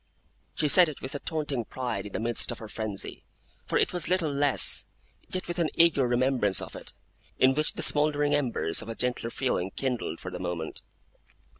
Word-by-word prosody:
She 150 - 0
said 175 +3 +7
it 150 - -9
with 130 - -6
a 140 - -4
taunting 150 -7 -3
pride 120 -1 -5
in 100 - -13
the - - -2
midst 115 +1 +1
of 120 - -3
her 110 - -9
frenzy 105 -2 -5 0.4
for - - 0
it - - +1
was 175 -2 -1
little 175 -5 0
less 140 -1 +5 0.4
yet 185 - -4
with 175 0 -4
an 165 -2 +1
eager 155 -6 +4
remembrance 120 -5 +1
of - - -8
it, - - -9 0.4
in 130 +1 +4
which 150 +2 0
the - - -3
smouldering 145 -1 +4
embers 125 - -1
of - - -9
a 115 - -5
gentler 125 -1 -2
feeling 115 -7 -2
kindled 125 -5 -4
for 90 - -7
the 90 - -7
moment. 85 -3 -5
130 Hz, 195 wpm, -27 LUFS, 115-150 Hz, 0.4 s, said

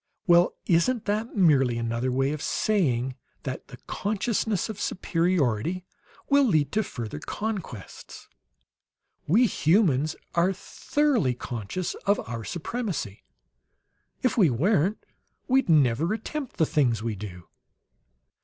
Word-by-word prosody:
'" - - -58
"Well, 175 -2 +5
isn't 195 +8 +2
that 215 +4 -2
merely 135 - +4
another 115 +2 -1
way 135 +2 +1
of 150 -1 -4
saying 135 - +1 0.3
that - - -5
the - - -11
consciousness 215 -1 -1
of 210 -2 -6
superiority 170 - 0 0.4
will 280 0 +5
lead 155 - +2
to 215 - +2
further 115 - -6
conquests? 190 - -6 1.0
We 220 +11 +5
humans 155 - +2 0.2
are 175 +3 +2
thoroughly 235 - 0
conscious 120 - -4
of 200 +1 +3
our 115 -1 -5
supremacy; 175 - -4 1.0
if 250 -2 +1
we 180 -7 +6
weren't 180 - +2 0.5
we'd 265 -5 +2
never 150 - +3
attempt 275 +4 -5
the 160 - +4
things 120 -8 +1
we 115 -1 -1
do!" 90 -3 -9
170 Hz, 120 wpm, -26 LUFS, 125-210 Hz, 1.0 s, we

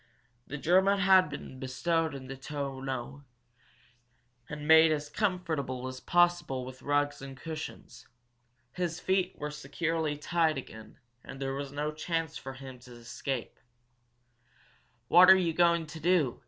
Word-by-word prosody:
The 150 - -5
German 190 +6 +3
had 190 -4 +5
been 135 -2 -8
bestowed 160 +4 -1
in 130 -1 -8
the 135 +1 -7
tonneau, 135 -1 -5 1.3
and 150 0 -6
made 160 0 +7
as 150 -1 -2
comfortable 160 - -2
as 130 0 -7
possible 175 -7 +1
with 130 0 -10
rugs 145 0 0
and 135 -1 -9
cushions. 160 +2 -8 0.6
His 175 +2 -3
feet 185 -1 0
were 150 0 -4
securely 150 +1 -2
tied 160 0 +1
again, 110 -4 -10 0.3
and 135 - -10
there 135 -1 -2
was 140 0 -5
no 150 +1 -2
chance 165 0 -3
for 135 - -7
him 130 -1 -10
to 125 0 -14
escape. 120 +1 -5 1.5
"What 180 +6 +8
are 190 - +9
you 170 -3 0
going 170 0 +3
to 160 +1 -9
do?" 160 -6 +2
150 Hz, 140 wpm, -30 LUFS, 135-170 Hz, 1.5 s, are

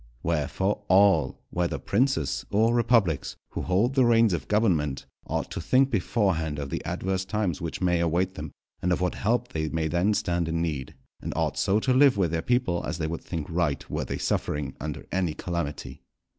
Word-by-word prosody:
Wherefore, 85 +6 0
all, 95 -8 +4
whether 90 -1 -1
princes 130 +3 0
or 110 +3 +3
republics, 100 - +2 0.2
who - - -4
hold 100 +8 +1
the 135 -1 +4
reins 115 -4 +4
of 75 -4 -3
government, 80 - +1 0.2
ought - - -2
to - - -4
think 130 +9 +3
beforehand 90 -7 0
of 70 -1 -5
the - - -3
adverse 95 0 -2
times 95 -4 -2
which 85 +2 -4
may 90 -2 +2
await 85 +3 +1
them, 75 -5 -7 0.3
and 90 - 0
of 90 - +2
what 90 0 0
help 120 +3 0
they 80 -1 -2
may 80 0 -1
then 90 +6 +1
stand 85 -3 0
in 80 0 -1
need; 75 -6 -3 0.3
and - - -4
ought - - 0
so 100 +3 +2
to 130 - +2
live 130 -3 +5
with 90 -5 +1
their 80 -1 0
people 120 -6 0
as 75 - -3
they 80 - -2
would 80 +1 -4
think 80 -4 -4
right 85 -4 -1
were - - -1
they - - -4
suffering 75 -2 -2
under 75 -2 -5
any 90 -4 0
calamity. 75 -5 -4
90 Hz, 195 wpm, -26 LUFS, 80-105 Hz, 0.3 s, live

